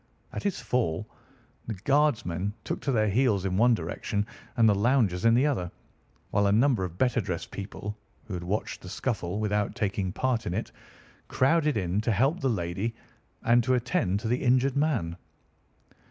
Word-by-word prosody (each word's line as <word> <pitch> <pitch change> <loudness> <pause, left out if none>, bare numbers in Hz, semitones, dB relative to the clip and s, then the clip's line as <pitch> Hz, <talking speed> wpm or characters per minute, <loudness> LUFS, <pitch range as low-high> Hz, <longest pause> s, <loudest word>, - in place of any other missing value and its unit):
At - - -3
his 200 -3 -1
fall 115 -11 -1 0.6
the 110 - -3
guardsmen 105 - +1
took - - -3
to 140 - -1
their 110 -4 +2
heels 105 -3 +2
in 95 -1 0
one 120 +4 +5
direction 105 -1 -3 0.3
and 115 -1 +6
the 105 - +5
loungers 105 -3 +2
in 115 0 +6
the 130 +4 +4
other, 105 -12 0 0.6
while 100 0 +3
a - - +3
number 115 -1 +3
of 90 -1 -5
better 125 0 +2
dressed 90 -4 -4
people, 100 +1 -6 0.3
who 110 - -7
had 90 -1 -4
watched 100 +5 -3
the 90 - -9
scuffle 100 -3 -2
without 105 -1 0
taking 100 -5 -1
part 120 +2 -1
in 90 - -2
it, 110 - -3 0.6
crowded 150 0 +2
in 95 +1 0
to 115 - 0
help 135 - +2
the 135 - +1
lady 100 +2 -2 0.5
and 120 +1 +4
to 130 +2 +2
attend 120 - 0
to 115 - -3
the 120 +3 0
injured 130 +1 +3
man. 125 - 0
110 Hz, 180 wpm, -28 LUFS, 95-125 Hz, 0.6 s, and